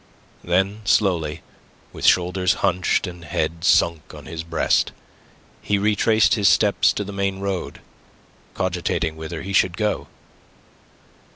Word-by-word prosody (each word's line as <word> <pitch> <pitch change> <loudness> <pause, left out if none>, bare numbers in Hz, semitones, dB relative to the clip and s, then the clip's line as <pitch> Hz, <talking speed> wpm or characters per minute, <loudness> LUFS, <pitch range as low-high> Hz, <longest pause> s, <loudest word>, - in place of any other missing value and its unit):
Then 95 +4 0
slowly, 85 -6 +1 0.5
with - - -2
shoulders 90 0 +3
hunched 90 +2 +1
and 90 -2 -9
head 80 0 -3
sunk 85 -3 +2
on - - -11
his 80 0 -6
breast, 85 -1 0 0.7
he 100 - 0
retraced 105 +1 +3
his 100 -3 +3
steps 80 - +3
to 105 - -3
the 100 0 -8
main 100 -1 -1
road, 95 -2 -4 0.7
cogitating 90 -3 -2
whither 80 +1 -7
he 100 +2 -5
should 90 -2 +2
go. 105 -1 -1
90 Hz, 125 wpm, -22 LUFS, 85-100 Hz, 0.7 s, shoulders